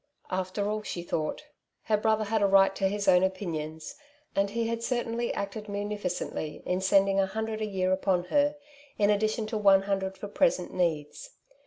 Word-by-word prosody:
After 185 +2 -2
all, 215 +1 -1
she 180 -4 -5
thought, 160 - -3 0.4
her 215 - +2
brother 215 +1 +1
had 215 +1 0
a 200 - +4
right 195 0 +5
to 195 - +1
his 205 +1 -2
own 180 - +6
opinions, 160 -5 -3 0.4
and 200 0 +2
he 230 +2 -1
had 230 0 -2
certainly 235 -1 -1
acted 200 +1 -5
munificently 200 -6 -4
in 180 +1 0
settling 195 +1 +3
a 195 - +3
hundred 220 +2 -3
a 215 - -1
year 185 -2 0
upon 185 -1 +1
her, 290 0 +3 0.4
in 205 0 +4
addition 215 +2 0
to 215 0 -3
one 195 -2 +5
hundred 190 -1 -2
for 205 - -6
present 205 -4 +1
needs. 170 - -2
200 Hz, 180 wpm, -28 LUFS, 185-215 Hz, 0.4 s, own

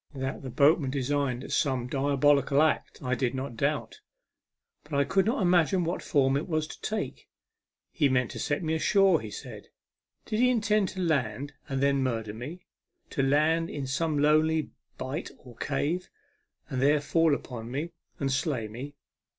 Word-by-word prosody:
That 135 +1 -3
the 135 - -6
boatman 145 +1 +3
designed 135 -1 -1
some 130 -4 +1
diabolical 140 +1 +3
act 155 - -1
I 125 -1 0
did 125 0 0
not 130 -2 -4
doubt, - - -1 0.8
but 150 0 -6
I 140 - +4
could 195 +8 +1
not 225 -3 +1
imagine 180 +1 +3
what 170 +2 -2
form 135 -2 +2
it 140 - -1
was 155 -2 0
to - - -11
take. 215 0 -4 0.6
He 145 -4 +2
meant 125 -2 +1
to - - -7
set 145 +4 -1
me 160 0 0
ashore, 190 +1 +4
he 110 - -7
said. - - -9 0.6
Did 215 - -2
he 250 +1 +5
intend 215 -4 +2
to 185 - -5
land 140 -4 -1 0.2
and 135 0 -1
then 140 -1 +3
murder 115 -5 -2
me; 145 +11 -8 0.5
to - - 0
land 155 +4 +2
me - - -8
in 140 -2 -3
some 150 +3 -1
lonely 155 +2 +3 0.3
bight 130 +4 -4
or 125 -4 -15
cave, 150 +8 -1 0.6
and 130 -1 -3
there 145 +2 +4
fall 160 +1 +2
upon 120 -4 -7
me, 145 +7 -3 0.3
and 135 -1 0
slay 135 -4 -1
me 130 +7 -8
145 Hz, 175 wpm, -28 LUFS, 130-160 Hz, 0.8 s, he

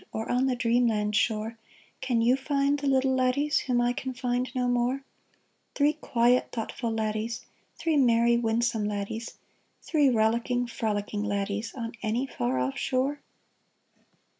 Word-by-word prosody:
Or 220 +1 -3
on 250 +2 +2
the 255 - +1
dreamland 230 -4 +1
shore, 220 +1 0 0.4
Can 245 -3 +1
you 245 +2 +4
find 280 +1 0
the 285 - -2
little 265 -1 +3
laddies 260 +3 +2
Whom 250 -2 0
I 240 0 +2
can 260 +1 -5
find 250 0 -1
no 250 -1 +1
more? 245 +2 0 0.7
Three 290 +1 +3
quiet, 245 -4 +2
thoughtful 230 +1 -3
laddies, 220 +1 -2 0.3
Three 325 -2 +1
merry, 235 -2 +4
winsome 230 -1 0
laddies. 210 +3 -4 0.5
Three 295 -4 +3
rollicking, 235 +2 +1
frolicking 210 -3 -2
laddies, 205 +2 -2
On 230 -3 -4
any 235 +4 0
far 130 - -2
off 130 +1 -1
shore 270 +2 0
240 Hz, 140 wpm, -27 LUFS, 220-260 Hz, 0.7 s, you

